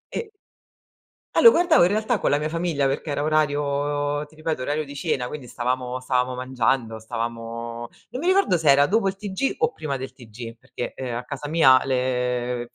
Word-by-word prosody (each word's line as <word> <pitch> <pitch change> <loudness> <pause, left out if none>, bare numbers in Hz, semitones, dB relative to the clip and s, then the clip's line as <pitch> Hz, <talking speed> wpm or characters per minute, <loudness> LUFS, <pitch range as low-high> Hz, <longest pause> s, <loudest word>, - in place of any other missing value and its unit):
e 450 -2 -4 1.1
Ah - - +4
lo 465 - +10
guardavo 340 - +4
in 175 - +4
realtà 215 +1 0
con - - +1
la 145 - +3
mia 155 +1 -2
famiglia 165 -4 0
perché 140 +3 -3
era 145 0 -1
orario 145 -1 0
ti 150 +1 -21
ripeto, 155 -4 -3
orario 150 +2 -1
di 140 0 -10
cena, 135 -6 -1
quindi 145 -5 -7
stavamo 125 +1 -2
stavamo 125 0 0
mangiando, 125 -3 -1
stavamo 115 +1 -5 0.2
non 250 +3 -5
mi 350 - -2
ricordo 375 - +4
se 155 -3 +2
era 140 +1 +6
dopo 200 +3 +2
il 195 - -1
TG 205 +5 -2
o 460 +1 +2
prima 140 - -4
del 130 0 -6
TG, 115 -1 -10
perché, 120 - -6
ehm, 125 -3 -5
a 120 - -4
casa 145 +2 -6
mia 135 -5 +6
le 125 -2 -1
140 Hz, 195 wpm, -24 LUFS, 125-155 Hz, 1.1 s, lo